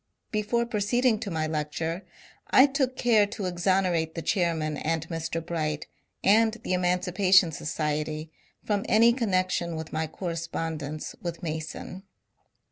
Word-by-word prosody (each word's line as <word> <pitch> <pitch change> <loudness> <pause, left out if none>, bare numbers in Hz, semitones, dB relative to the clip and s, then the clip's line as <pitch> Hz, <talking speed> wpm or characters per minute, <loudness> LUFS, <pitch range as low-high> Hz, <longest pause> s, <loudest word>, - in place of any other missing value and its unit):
Before 215 +2 0
proceed 235 +2 0
ing 225 -4 +4
to 210 - -4
my 160 -3 -1
lecture, 160 +3 -3 0.5
I 260 - +8
took 265 -2 0
care 220 -4 +4
to 200 -1 -5
exonerate 175 -2 +1
the 165 - -4
chairman 165 -4 0
and 160 +1 -2
Mr. 165 0 -3
Bright 155 -3 -2 0.4
and 220 +2 +5
the 185 - -1
Emancipation 180 0 +3
Society 155 0 -3 0.3
from 205 -1 0
any 230 +2 +6
connec 185 -7 +1
tion 170 -1 -1
with 160 0 -6
my 160 0 -1
correspondence 160 -3 -4
with 170 -1 -5
Mason. 160 +3 -5
175 Hz, 135 wpm, -27 LUFS, 160-205 Hz, 0.5 s, I